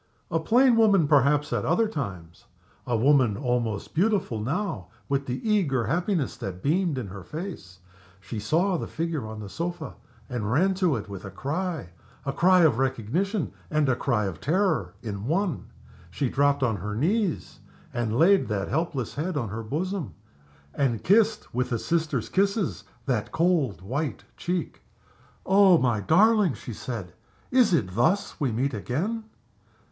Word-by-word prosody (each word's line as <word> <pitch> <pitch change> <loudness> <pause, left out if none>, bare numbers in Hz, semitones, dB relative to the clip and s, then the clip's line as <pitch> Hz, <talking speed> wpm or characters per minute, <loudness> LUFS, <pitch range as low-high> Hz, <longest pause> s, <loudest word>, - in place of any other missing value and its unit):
A 165 - +2
plain 240 +8 +4
woman, 200 -8 +5
perhaps, 145 +1 +3
at - - 0
other 220 +7 +2
times. 90 - -6 0.4
A 120 -2 +1
woman 125 -4 +3
almost 120 -5 -2
beautiful 190 - +1
now, 135 - -2 0.2
with 140 0 -1
the 130 - -4
eager 155 - +2
happiness 170 - 0
that 95 -1 -6
beamed 165 0 +1
in 115 -6 -4
her 95 0 -9
face. 150 - -7 0.4
She 95 +3 -6
saw 170 - +1
the - - -4
figure 160 -7 -3
on 110 0 -7
the 105 - -7
sofa. 170 - -4 0.3
She 125 - -4
ran 140 - +2
to 180 -6 +1
it 105 -2 -5
with 100 -2 -8
a 95 - -6
cry 150 - -3 0.4
a 140 - -1
cry 185 +3 +5
of 145 -8 +4
recognition 135 - -1 0.2
and 150 -2 +1
a 130 - +3
cry 120 -5 0
of 95 -4 -5
terror 190 +7 +1
in 105 -1 -5
one. 175 -1 -1 0.4
She 135 - -1
dropped 140 +1 +2
on 115 -5 +1
her 105 +3 -4
knees 185 - -1 0.3
and 115 -2 -1
laid 190 +6 +5
that 100 -3 -2
helpless 150 -6 -2
head 160 +2 -2
on 120 -7 -2
her 110 +3 -4
bosom, 155 - -3 0.6
and 120 -6 0
kissed, 215 +2 +2
with 125 +2 -1
a 115 - +1
sister's 155 -3 -1
kisses, 200 0 0 0.2
that 120 -6 -1
cold, 155 - +1
white 125 - -3
cheek. 175 -1 -3 0.6
"Oh, 190 -2 +6
my 120 -7 +1
darling!" 195 - +4
she 120 - -8
said. 105 -5 -6 0.4
"Is 250 -5 +4
it 95 - +1
thus 160 - +1
we 140 -5 0
meet 130 +5 -1
again?" 175 - -2
140 Hz, 160 wpm, -26 LUFS, 115-180 Hz, 0.6 s, Oh